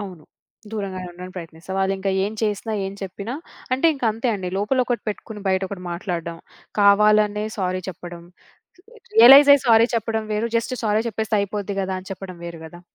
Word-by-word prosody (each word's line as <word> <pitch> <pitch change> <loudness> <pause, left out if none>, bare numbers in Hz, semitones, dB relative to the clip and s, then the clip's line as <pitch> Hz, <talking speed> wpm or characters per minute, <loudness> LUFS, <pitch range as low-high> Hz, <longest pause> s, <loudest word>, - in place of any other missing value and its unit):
అవును. 185 -6 -9 0.5
దూరంగానే 190 -4 -4
ఉండడానికి 180 +1 -10
ప్రయత్నిస్తా. 165 +1 -8
వాళ్ళింకా 195 0 0
ఏం 210 - -3
చేసినా, 215 +1 -1
ఏం 195 - -5
చెప్పినా 200 +6 -6 0.4
అంటే 270 +6 +2
ఇంకంతే 230 -2 -1
అండి. 185 -2 -4
లోపలొకటి 245 +3 0
పెట్టుకొని 210 0 -6
బయటొకటి 190 0 -1
మాట్లాడడం. 170 -2 -4 0.4
కావాలనే 210 +1 +4
సారీ 185 0 -1
చెప్పడం. 175 -1 -8 0.9
రియలైజ్ 270 +5 +9
అయ్యి 275 -1 -1
సారీ 225 0 +6
చెప్పడం 225 0 -1
వేరు. 220 +2 -1
జస్ట్ 230 +2 -1
సారీ 215 0 +2
చెప్పేస్తే 220 0 -2
అయిపోద్ది 200 0 -3
గదా! 190 0 -2
అని 190 - -13
చెప్పడం 185 -2 -9
వేరు 170 -1 -7
గదా! 175 +2 -13
200 Hz, 155 wpm, -22 LUFS, 185-220 Hz, 0.9 s, రియలైజ్